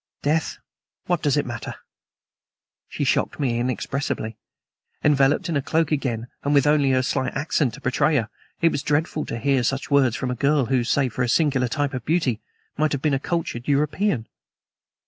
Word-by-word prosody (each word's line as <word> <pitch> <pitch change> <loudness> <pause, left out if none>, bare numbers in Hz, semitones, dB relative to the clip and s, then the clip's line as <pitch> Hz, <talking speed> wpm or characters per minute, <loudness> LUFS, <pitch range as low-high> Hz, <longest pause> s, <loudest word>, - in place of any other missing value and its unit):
Death! 155 +2 0 0.5
What 175 -2 0
does 145 -1 +2
it 145 - +1
matter?" 120 -2 -6 1.1
She - - -3
shocked - - 0
me 120 -5 0
inexpressibly. 125 -2 -2 0.7
Enveloped 145 +4 +3
in 170 - -2
her 140 - +1
cloak 160 +4 0
again, 125 -6 -1 0.2
and 145 +1 +1
with 140 - +4
only 145 -2 +3
her 130 -1 +2
slight 130 0 -1
accent 140 -4 0
to - - -13
betray 150 +4 +1
her, 115 -5 +1 0.3
it 165 -1 +4
was 140 - -2
dreadful 150 +2 -1
to 115 - -4
hear 135 +1 +2
such 135 +4 -2
words 135 -5 +4
from 130 0 -2
a - - -2
girl 140 +1 +2
who, 125 0 +1
save 130 0 +1
for 125 - -3
her 125 - +2
singular 135 -1 +2
type 145 +3 -1
of 125 -2 -4
beauty, 140 -8 0 0.4
might 155 0 +2
have 140 - -2
been 150 -2 +2
a 135 - +1
cultured 145 -6 -3
European. 150 - +1
140 Hz, 185 wpm, -23 LUFS, 125-150 Hz, 1.1 s, with